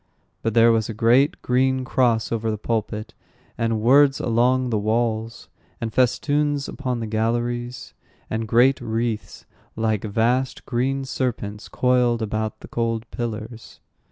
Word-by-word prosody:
But 115 -1 -2
there 115 0 +6
was 110 -1 +1
a 110 - -5
great 120 +6 +3
green 130 +1 +1
cross 120 -4 +1
over 115 -1 -1
the 110 - -1
pulpit, 110 0 -3 0.4
and 115 -2 -1
words 135 +4 +5
along 125 +2 +2
the 110 - +1
walls, 110 +1 -1 0.3
and 115 -2 -4
festoons 145 +3 +1
upon 125 -4 -3
the - - -2
galleries, 120 +3 -2 0.3
and 110 0 -3
great 125 +5 +4
wreaths, 115 -1 -3 0.3
like 110 -2 0
vast 120 +5 0
green 135 +2 -1
serpents, 110 -6 -3
coiled 125 -2 +2
about 110 0 -3
the - - -10
cold 115 -1 -2
pillars. 115 -1 -6
115 Hz, 135 wpm, -23 LUFS, 110-125 Hz, 0.4 s, there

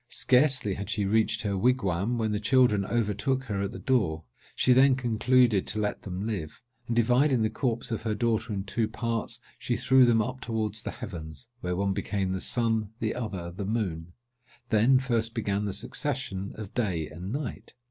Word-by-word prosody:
Scarcely 130 -5 +2
had 100 +2 -6
she 105 - 0
reached 110 +2 +1
her 100 -2 -1
wigwam, 105 -1 +1
when 110 -2 0
the 105 - 0
children 120 -3 +3
overtook 120 +5 0
her 105 -6 -3
at 100 - -2
the - - -7
door. 95 -12 0 0.3
She 125 - +4
then 130 +1 +6
concluded 120 -3 +2
to 110 - -1
let 105 -1 -2
them 95 +1 -5
live; 100 -8 -5 0.2
and, 115 - -1
dividing 125 +2 +3
the 110 - 0
corpse 120 -2 -2
of 115 - -2
her 110 -1 -1
daughter 115 +1 0
in 100 -2 -2
two 110 +3 -1
parts, 115 0 -3 0.2
she 120 - -1
threw 130 +2 +5
them 115 -2 +4
up 130 +4 -2
towards 110 -2 -2
the - - -4
heavens, 80 - -8
where 90 -3 -2
one 100 +1 0
became 95 -1 -2
the 95 0 -2
sun, 115 -3 +1
the 110 -1 -1
other 100 -8 -5
the 100 +4 -6
moon. 90 -6 -3 0.6
Then 115 +5 +5
first 115 -3 0
began 105 -2 -1
the 100 - -1
succession 100 -2 -3
of 105 -3 -8
day 90 -10 -1
and 90 +5 -7
night. 120 -6 -5
110 Hz, 190 wpm, -28 LUFS, 100-120 Hz, 0.6 s, then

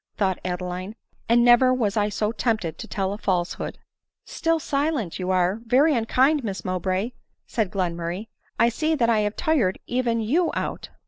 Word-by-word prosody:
thought 190 -3 0
Adeline, 180 +2 -4 0.3
"and 235 +1 +5
never 245 +1 +6
was 225 -6 0
I 210 -1 +2
so 210 +1 -1
tempted 215 -9 -1
to - - -7
tell 195 -1 -2
a 205 - -7
falsehood." 180 -4 -2 0.3
" - - -65
Still 330 0 0
silent! 280 - -1
you 180 0 -3
are 185 +2 +2
very 270 +7 +4
unkind, 260 +5 +2
Miss 200 -3 -4
Mowbray," 185 +4 -1 0.3
said 220 -5 -1
Glenmurrray; 175 +1 -3 0.2
" - - -38
I 230 +1 +5
see 310 +7 0
that 235 -5 +2
I 220 - +3
have 210 0 -1
tired 250 -13 +1
even 240 -2 0
you 305 +11 +1
out." - - -4
215 Hz, 180 wpm, -24 LUFS, 185-250 Hz, 0.3 s, never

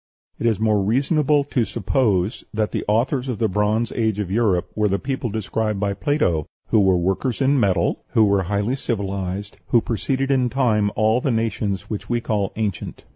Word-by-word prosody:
It 115 - +1
is 110 -3 +1
more 110 -2 +2
reasonable 140 - +2
to 135 -3 0
suppose 110 -3 0
that 110 -1 -1
the - - -2
authors 125 +5 +1
of 125 -4 -2
the 110 - +1
Bronze 105 +3 0
Age 110 -3 0
of 100 -3 -3
Europe 100 -5 +1
were 105 -1 +2
the 100 0 +1
people 130 0 -3
described 110 0 -2
by 100 0 0
Plato, 100 - 0 0.2
who 110 - +4
were 95 -2 +4
workers 95 +7 -1
in 135 +1 +3
metal, 95 -6 +1
who 110 - +5
were 100 -1 +2
highly 100 +6 -1
civilized, 100 -5 -3
who 120 - +4
preceded 130 +5 -1
in 130 -2 +2
time 115 -6 +2
all 110 +3 +2
the 135 - 0
nations 110 -4 -1
which 105 - -5
we 120 - +1
call 105 -4 -1
ancient. 105 -5 -4
110 Hz, 185 wpm, -22 LUFS, 100-125 Hz, 0.2 s, who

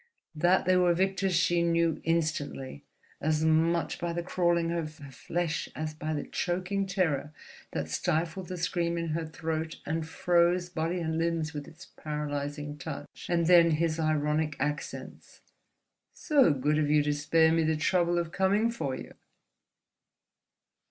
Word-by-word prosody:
That 175 +4 +3
they 185 - +4
were 175 -1 +4
Victor's 190 0 +1
she 170 +1 +3
knew 170 -1 +1
instantly, 155 - -2 0.4
as 155 +1 +1
much 165 +2 +2
by 170 -1 -2
the 170 0 -2
crawling 170 -2 +1
of 160 -2 -3
her 140 -3 -11
flesh 165 +3 -3
as 155 0 -3
by 155 0 -4
the 145 - -2
choking 185 +2 -2
terror 160 -7 0 0.4
that 80 -1 -2
stifled 165 - -1
the 180 - -5
scream 170 -1 -1
in 165 -1 -2
her 160 +1 -2
throat 160 0 -4
and 160 +1 -2
froze 175 +1 +2
body 170 +1 -2
and 160 -1 -1
limbs 165 -1 -1
with 145 -1 -6
its 170 +3 -13
paralyzing 145 -1 -5
touch. 145 +1 -8
And 170 -1 +2
then 170 -1 +7
his 165 0 0
ironic 155 -1 +1
accents: 145 +2 -5 0.7
"So 285 - +3
good 145 +2 +1
of 150 -1 +1
you 150 0 +4
to 150 0 +1
spare 160 +2 +3
me 165 0 +3
the 160 0 +1
trouble 175 +2 +2
of 170 -1 -1
coming 200 +5 +2
for 140 - -3
you!" - - -9
165 Hz, 155 wpm, -29 LUFS, 155-175 Hz, 0.7 s, then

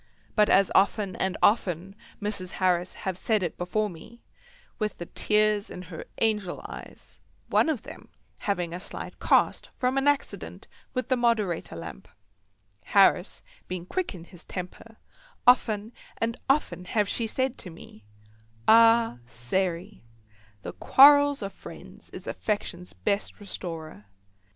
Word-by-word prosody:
But, 210 -1 +4
as 195 0 +4
often 195 -1 +2
and 190 -1 -1
often 195 -3 +2 0.2
Mrs. 200 -3 -2
Harris 180 -1 +1
have 185 -1 -2
said 215 -4 +1
it 175 - -3
before 210 +4 -1
me, 205 +6 -12 0.6
with 215 -2 -2
the 175 - -6
tears 210 +2 +1
in 180 - -8
her 165 -2 -9
angel 210 -5 0
eyes—one - - -4
of 275 -8 -2
them - - -11 0.3
having 180 -5 -2
a 175 - -4
slight - - -6
cast - - +2
from 255 +1 +1
an 270 - 0
accident 290 -1 -1 0.3
with 255 - -2
the 260 - +4
moderator 220 - 0
lamp, 80 -7 -9 0.8
Harris 195 -2 +3 0.2
being 180 -1 -5
quick 360 - -3
in 170 - -10
his 175 0 -13
temper—often 225 - -1 0.2
and 230 +1 -1
often 180 - +1
have 210 +2 +1
she 230 +2 0
said 260 +3 0
to 185 - -7
me: 160 -10 -14 0.6
"Ah, 230 - +6
Sairey, 170 - -2 0.6
the - - -6
quarrels 285 -1 +6
of 195 - -5
friends - - -12
is - - -10
affection's 180 -4 -3
best 205 -1 -2
restorer." 165 - -7
200 Hz, 135 wpm, -27 LUFS, 180-230 Hz, 0.8 s, Ah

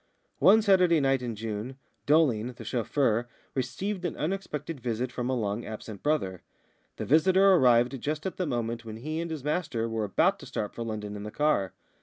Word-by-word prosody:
One 215 +3 +6
Saturday 185 -5 +5
night 135 -2 +2
in 120 -3 -4
June, 110 +4 -5 0.3
Dolling, 130 -6 +3
the 115 -1 -11
chauffeur, 120 0 0 0.2
received 180 - -3
an 175 - -3
unexpected 160 -4 -3
visit 120 +1 -2
from 125 0 -3
a 130 - +1
long 105 -1 -2
absent 110 -1 -8
brother. 95 - -1 0.5
The - - -4
visitor 190 +6 +5
arrived 125 -4 +4
just 155 +1 -3
at 190 - -3
the 180 - -1
moment 120 -3 -2
when 110 -1 -7
he 155 +7 -4
and 170 - -4
his 155 -4 -5
master 145 -7 -1
were 110 -1 -2
about 100 - +2
to - - -10
start 105 - -4
for - - -7
London 105 -2 -5
in 105 - -6
the 105 - -5
car. 125 -8 +1
125 Hz, 190 wpm, -28 LUFS, 115-155 Hz, 0.5 s, One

